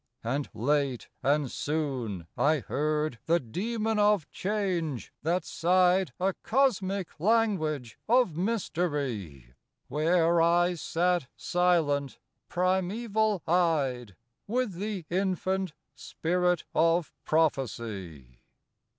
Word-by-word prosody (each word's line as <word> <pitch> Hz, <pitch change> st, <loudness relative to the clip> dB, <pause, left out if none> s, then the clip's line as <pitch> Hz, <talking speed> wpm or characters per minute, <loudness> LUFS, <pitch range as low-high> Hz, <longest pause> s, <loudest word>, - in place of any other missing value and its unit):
And 135 Hz, +5 st, -2 dB
late 140 Hz, 0 st, 0 dB
and 145 Hz, -1 st, +1 dB
soon 130 Hz, -, -2 dB
I 155 Hz, +2 st, +3 dB
heard 150 Hz, -2 st, -1 dB
the 170 Hz, +1 st, +4 dB
Dæmon 215 Hz, -, -2 dB
of 205 Hz, -6 st, +3 dB
Change 180 Hz, -, -2 dB
that 170 Hz, +2 st, 0 dB
sighed 180 Hz, +2 st, +3 dB
A 190 Hz, +1 st, +1 dB
cosmic 200 Hz, -, 0 dB
language 165 Hz, -, +1 dB
of 240 Hz, -9 st, +4 dB
mystery; 145 Hz, -, -2 dB, 0.4 s
Where 165 Hz, +2 st, +3 dB
I 175 Hz, +2 st, +3 dB
sat 175 Hz, -2 st, 0 dB
silent, 160 Hz, -6 st, +1 dB, 0.3 s
primeval 200 Hz, +3 st, 0 dB
eyed, 140 Hz, -, +1 dB, 0.3 s
With 240 Hz, -1 st, 0 dB
the 195 Hz, -1 st, -4 dB
infant 190 Hz, -1 st, 0 dB, 0.2 s
Spirit 175 Hz, +6 st, 0 dB
of 165 Hz, 0 st, +2 dB
Prophecy. 110 Hz, -, -2 dB
170 Hz, 90 wpm, -28 LUFS, 140-190 Hz, 0.4 s, the